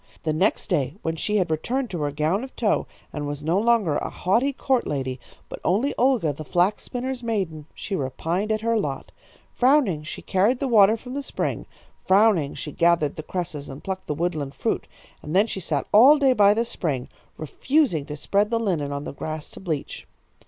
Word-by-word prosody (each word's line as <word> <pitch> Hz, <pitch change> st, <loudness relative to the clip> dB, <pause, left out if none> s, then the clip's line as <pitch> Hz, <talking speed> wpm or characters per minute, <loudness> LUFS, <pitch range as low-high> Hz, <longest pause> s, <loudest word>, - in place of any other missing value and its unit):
The 155 Hz, -, 0 dB
next 185 Hz, +7 st, +1 dB
day, 150 Hz, -7 st, -1 dB
when 160 Hz, 0 st, -1 dB
she 210 Hz, +6 st, -1 dB
had 180 Hz, -4 st, 0 dB
returned 245 Hz, -, -1 dB
to 175 Hz, -4 st, -3 dB
her 145 Hz, -, 0 dB
gown 155 Hz, -, 0 dB
of 265 Hz, -, -9 dB
tow, 215 Hz, -3 st, +1 dB, 0.3 s
and 145 Hz, -1 st, -4 dB
was 145 Hz, 0 st, -5 dB
no 165 Hz, +5 st, +2 dB
longer 215 Hz, -9 st, +2 dB
a -, -, -3 dB
haughty 230 Hz, +10 st, +1 dB
court 265 Hz, -2 st, 0 dB
lady, 130 Hz, -2 st, -3 dB, 0.3 s
but -, -, -8 dB
only 225 Hz, +11 st, +1 dB
Olga, 240 Hz, -, +2 dB
the 155 Hz, -, -8 dB
flax 180 Hz, +7 st, +1 dB
spinner's 255 Hz, 0 st, -4 dB
maiden, 190 Hz, -10 st, -3 dB
she 200 Hz, -, -4 dB
repined 170 Hz, +8 st, -2 dB
at 215 Hz, 0 st, 0 dB
her 230 Hz, 0 st, +1 dB
lot. 140 Hz, -8 st, -4 dB, 0.4 s
Frowning 250 Hz, -, +3 dB
she 155 Hz, -, -8 dB
carried 205 Hz, +7 st, +2 dB
the 275 Hz, -, -1 dB
water 220 Hz, -2 st, +5 dB
from 250 Hz, +2 st, -9 dB
the 285 Hz, -, -2 dB
spring. -, -, -3 dB, 0.4 s
Frowning 190 Hz, -7 st, +3 dB
she 150 Hz, -, -6 dB
gathered 170 Hz, -2 st, +2 dB
the -, -, -5 dB
cresses 155 Hz, -4 st, -5 dB
and 135 Hz, +1 st, -9 dB
plucked 190 Hz, 0 st, -5 dB
the 150 Hz, -, -2 dB
woodland 155 Hz, -4 st, -2 dB
fruit. -, -, -2 dB, 0.3 s
And 150 Hz, +4 st, -5 dB
then 200 Hz, +3 st, +5 dB
she 210 Hz, -, -5 dB
sat 150 Hz, -6 st, -2 dB
all 260 Hz, +8 st, +8 dB
day 275 Hz, -3 st, +4 dB
by 205 Hz, -3 st, +5 dB
the 230 Hz, +1 st, +1 dB
spring, 145 Hz, -, -3 dB, 0.3 s
refusing 170 Hz, -, 0 dB
to 150 Hz, -, -6 dB
spread 200 Hz, +7 st, +1 dB
the 230 Hz, 0 st, +1 dB
linen 170 Hz, -10 st, -1 dB
on 140 Hz, 0 st, -4 dB
the -, -, -6 dB
grass 155 Hz, +2 st, -6 dB
to -, -, -11 dB
bleach. 160 Hz, -7 st, -4 dB
185 Hz, 200 wpm, -24 LUFS, 150-230 Hz, 0.4 s, all